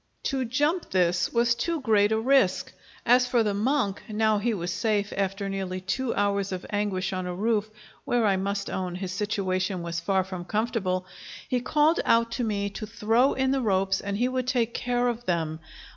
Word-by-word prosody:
To 265 -2 -1
jump 290 +8 0
this 180 -1 +1
was 235 0 +3
too 330 +7 -2
great 215 -5 +3
a 220 - +2
risk. 240 -6 +2 0.3
As 250 +1 +5
for 245 -2 +2
the 210 -2 0
monk, 210 -1 0
now 215 0 +2
he 235 +3 0
was 180 -4 -2
safe 205 0 0
after 195 +1 -1
nearly 190 -1 -3
two 230 +7 -2
hours 200 -1 0
of 185 -1 -5
anguish 195 -2 -1
on 185 -1 -3
a 180 - -4
roof, 215 +1 0 0.3
where, 240 -2 +1
I 200 -2 +3
must 200 +1 -2
own, 185 -2 -3
his 185 0 -4
situation 190 -2 -1
was 170 -1 -3
far 190 +2 +1
from 185 -2 -7
comfortable, 200 -3 -1 0.4
he 250 - 0
called 305 +5 +3
out 230 0 +3
to 245 - -2
me 205 -3 -1
to 215 +1 -6
throw 225 +5 +2
in 265 0 +1
the 270 -1 +1
ropes 190 -3 +1
and 200 0 -3
he 245 +3 +2
would 255 -1 -2
take 240 -3 +1
care 245 0 0
of 240 0 -3
them. 160 -3 -1
205 Hz, 195 wpm, -26 LUFS, 190-240 Hz, 0.4 s, As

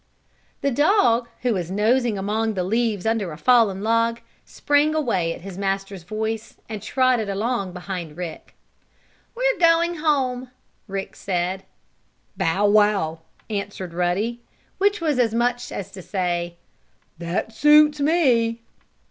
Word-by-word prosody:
The 280 - +1
dog, 250 - +3 0.2
who 245 -2 +2
was 175 -4 -3
nosing 220 +3 +1
among 215 +3 -1
the 185 - -1
leaves 220 0 0
under 220 -5 0
a 150 - -8
fallen 215 -3 +3
log, 230 +1 +1 0.2
sprang 295 +2 +1
away 190 - 0
at 165 - -7
his 190 0 -8
master's 195 -1 -2
voice 220 +4 -4
and 215 -2 -6
trotted 245 -1 +1
along 200 -1 -2
behind 180 -4 -6
Rick. 175 -3 -7 0.8
"We're - - +1
going 335 0 +3
home!" 260 -5 0 0.4
Rick 195 -1 -5
said. 185 0 -2 0.7
"Bow 190 +5 +1
wow!" 205 -6 +3 0.3
answered 200 -4 -5
Ruddy, 190 +7 -1 0.4
which 405 0 +2
was 300 -6 0
as 230 -2 +2
much 245 +1 0
as 195 - -6
to 190 - -9
say: 175 -2 -2 0.6
"That 175 +6 -3
suits 300 +3 +5
me!" 245 -7 +2
220 Hz, 130 wpm, -23 LUFS, 190-250 Hz, 0.8 s, suits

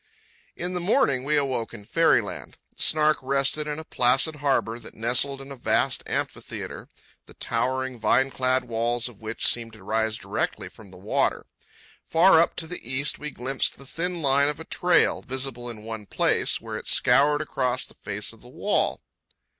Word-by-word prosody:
In 180 +1 -4
the 180 - -1
morning 175 - +2
we 150 +2 +2
awoke 130 -5 -1
in 105 -3 -10
fairyland. - - +1 0.2
The - - -8
Snark 155 0 +3
rested 140 +3 0
in 150 0 -3
a 160 - -6
placid 135 +3 +1
harbour 135 -5 0
that 115 - -11
nestled 125 +4 +2
in 135 +1 -10
a - - -6
vast 120 - +1
amphitheatre, - - -4 0.4
the - - -14
towering, 130 -1 -2
vine 130 +4 +2
clad 130 0 +1
walls 120 0 0
of 120 -4 -12
which 110 +1 -2
seemed 115 -2 +1
to 110 -3 -14
rise 110 +1 0
directly - - -3
from 110 - -15
the 95 - -14
water. 100 +4 0 0.6
Far 165 +1 +6
up, 170 - +3
to 165 - -1
the 180 +2 -6
east, 130 +4 -1
we 150 - -5
glimpsed 130 0 -2
the 140 - -12
thin 170 +3 -3
line 140 +1 +4
of 150 - -4
a 160 - -8
trail, 180 0 +2
visible 130 -2 -3
in 110 -2 -8
one 110 -2 -7
place, - - +1
where - - -6
it - - -9
scoured 145 +4 +4
across 130 -4 -1
the - - -14
face - - -4
of - - -18
the - - -14
wall. - - 0
130 Hz, 185 wpm, -25 LUFS, 120-150 Hz, 0.6 s, Far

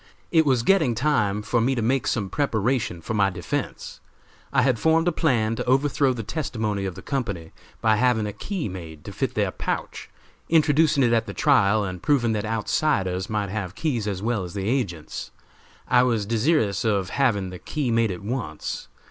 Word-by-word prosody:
It 160 -3 +4
was 130 -4 +3
getting 155 -8 +3
time 105 -6 +1
for 120 +2 +1
me 130 +3 +1
to 120 - -1
make 130 +4 +1
some 105 -5 0
preparation 115 - -1
for 110 - -4
my 100 -2 +3
defense. 90 -2 -4 0.5
I 130 -2 +3
had 130 -4 +2
formed 160 +4 +3
a - - +4
plan 120 -9 +1
to - - -3
overthrow 135 +1 +2
the 120 -3 -4
testimony 110 -7 -2
of 95 -2 -4
the 95 - -10
company 100 - -3 0.3
by 110 -1 +3
having 120 -2 +2
a 105 - -4
key 185 - -4
made 80 -5 -9
to - - -6
fit - - -2
their - - +1
pouch, - - -4 0.4
introducing 155 -2 +4
it 120 -1 +3
at 115 0 +1
the 100 - -6
trial 110 -8 +3
and 90 -2 -5
proving 125 -6 +2
that 105 -1 -1
outsiders 105 -4 0
might 105 -2 -1
have 100 -3 -4
keys 120 -8 -1
as 100 -1 -3
well 115 -4 0
as 90 +2 -8
the 100 0 -2
agents. 100 - -2 0.6
I 125 - +5
was 115 -5 +1
desirous 115 -1 +1
of 100 -4 0
having 105 -9 +1
the 90 - -8
key 145 -6 -2
made 115 -1 +2
at 90 0 -5
once. 105 -9 -4
115 Hz, 190 wpm, -24 LUFS, 100-135 Hz, 0.6 s, I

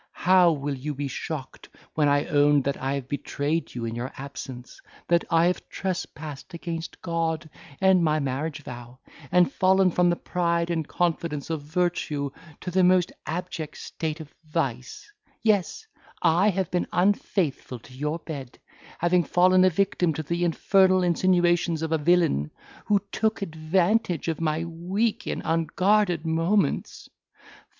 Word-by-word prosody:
how 180 -1 +6
will 145 -2 -2
you 145 +3 -4
be 140 +1 -3
shocked 140 0 -6 0.2
when 150 -2 +2
I 145 0 +2
own 145 -1 +3
that 140 +1 -1
I 135 +1 -1
have 135 -2 -5
betrayed 145 +2 -2
you 120 -1 -3
in 115 - -3
your 120 +3 -4
absence, 135 - -8 0.3
that 170 0 +3
I 165 0 +4
have 180 +1 -1
trespassed 160 -4 -5
against 165 -1 -6
God 165 -2 -1 0.3
and 190 -2 +4
my 155 -1 +2
marriage 145 +2 -3
vow, 120 -1 -9 0.3
and 180 -1 +4
fallen 190 0 +4
from 175 +1 +3
the 175 - +2
pride 170 -1 -1
and 160 -3 -1
confidence 165 -4 -1
of 160 -2 -2
virtue 150 -3 -1 0.3
to 180 - -4
the 185 +1 +3
most 180 -1 +4 0.2
abject 165 -1 -4
state 160 -1 -4
of 155 -2 -10
vice; 135 -5 -3 0.4
yes, 215 - +1 0.3
I 180 +6 +4
have 190 -1 -1
been 180 - 0
unfaithful 180 - 0
to 125 +2 -16
your 150 +5 -2
bed, 145 -6 -8 0.4
having 175 +1 +2
fallen 185 +3 +4
a 185 - +6
victim 180 -3 +1
to 155 - -3
the 170 +3 -2
infernal 185 +2 +3
insinuations 175 -2 +2
of 160 - -3
a 160 - +2
villain, 150 - +2 0.4
who 205 -2 +2
took 220 -1 0
advantage 175 +2 0
of 165 0 -3
my 155 0 0
weak 185 +7 -2
and - - -3
unguarded 175 +2 +1
moments. 165 +1 0
165 Hz, 150 wpm, -25 LUFS, 145-180 Hz, 0.4 s, how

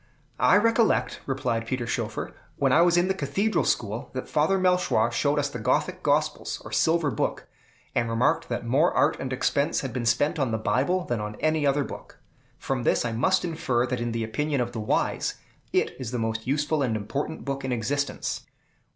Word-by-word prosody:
"I 125 +9 +6
recollect," 230 +1 +2
replied 120 -4 -1
Peter 125 -1 -2
Schoeffer, 115 -2 -3 0.2
"when - - +1
I 165 - +6
was 175 0 +4
in 175 +1 +3
the 190 - +2
Cathedral 190 +7 0
school, 110 +3 -1
that 130 - -4
Father 155 +6 +2
Melchoir 180 -11 +2
showed 145 +4 +1
us 145 -1 +1
the 140 -4 -6
Gothic 110 - 0
Gospels, - - 0
or - - -8
Silver 160 -3 +2
Book, - - -2 0.5
and 115 -1 0
remarked 115 +2 +1
that - - -3
more 140 +9 +3
art - - +3
and 130 0 -4
expense 140 +2 +1
had 135 -4 -5
been 120 -2 -2
spent 145 +7 +2
on 135 -3 +1
the 110 - 0
Bible 140 +11 +1
than 120 -3 -2
on 105 0 -5
any 155 +1 +1
other 140 +1 +2
book. - - -9 0.4
From 135 -2 -2
this 120 - +2
I 120 - -1
must 150 +14 +2
infer 155 -8 0
that 125 -1 -3
in 120 0 -1
the 115 0 -2
opinion 145 +6 -1
of 120 -1 -1
the 115 - -5
wise, 105 - 0 0.4
it - - +1
is 130 -4 -4
the 125 - -3
most 115 0 -2
useful 150 +2 +1
and 120 -5 0
important 140 +9 -4
book 140 0 -3
in 130 - -2
existence." 135 +5 -2
135 Hz, 200 wpm, -26 LUFS, 120-155 Hz, 0.5 s, I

